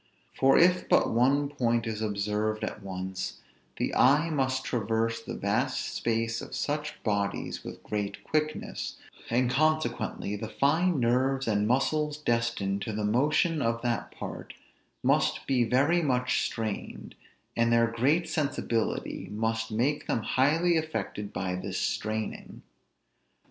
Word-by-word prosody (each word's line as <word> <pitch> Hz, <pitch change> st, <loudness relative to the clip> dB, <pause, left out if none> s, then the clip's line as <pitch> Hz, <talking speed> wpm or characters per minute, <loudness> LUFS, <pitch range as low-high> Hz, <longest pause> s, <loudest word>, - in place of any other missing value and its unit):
For 135 Hz, 0 st, +4 dB
if 180 Hz, +1 st, +4 dB
but -, -, +4 dB
one 135 Hz, +5 st, +3 dB
point 120 Hz, -5 st, 0 dB
is 110 Hz, -1 st, -3 dB
observed 105 Hz, +1 st, -1 dB
at 110 Hz, -, -4 dB
once, 95 Hz, -1 st, -5 dB, 0.4 s
the -, -, -1 dB
eye 150 Hz, +6 st, +4 dB
must 130 Hz, -3 st, 0 dB
traverse 115 Hz, 0 st, 0 dB
the -, -, -6 dB
vast 120 Hz, +6 st, -1 dB
space 115 Hz, 0 st, -1 dB
of -, -, -7 dB
such 150 Hz, +1 st, -3 dB
bodies 100 Hz, -2 st, -1 dB
with -, -, -9 dB
great 105 Hz, -1 st, -3 dB
quickness, 155 Hz, 0 st, -2 dB, 0.3 s
and 125 Hz, +2 st, +2 dB
consequently 125 Hz, -8 st, 0 dB
the 110 Hz, +1 st, -5 dB
fine 160 Hz, +6 st, +2 dB
nerves 130 Hz, +2 st, +1 dB
and 105 Hz, -1 st, +2 dB
muscles 150 Hz, +4 st, +1 dB
destined 115 Hz, -7 st, 0 dB
to 110 Hz, -, -3 dB
the 105 Hz, 0 st, -1 dB
motion 150 Hz, +8 st, +2 dB
of 115 Hz, -1 st, 0 dB
that 120 Hz, -1 st, -1 dB
part -, -, -8 dB, 0.5 s
must -, -, +2 dB
be 130 Hz, -3 st, +2 dB
very 140 Hz, +9 st, +3 dB
much 125 Hz, -4 st, +1 dB
strained; 110 Hz, -3 st, -5 dB, 0.4 s
and 115 Hz, 0 st, +2 dB
their 115 Hz, 0 st, +5 dB
great 135 Hz, +9 st, +1 dB
sensibility 135 Hz, -6 st, -1 dB
must 110 Hz, +1 st, -1 dB
make 130 Hz, +7 st, 0 dB
them 115 Hz, -, 0 dB
highly 160 Hz, +8 st, +3 dB
affected 155 Hz, -10 st, -3 dB
by 90 Hz, 0 st, -2 dB
this 90 Hz, -, -4 dB
straining. 110 Hz, 0 st, -3 dB
120 Hz, 135 wpm, -28 LUFS, 110-145 Hz, 0.5 s, their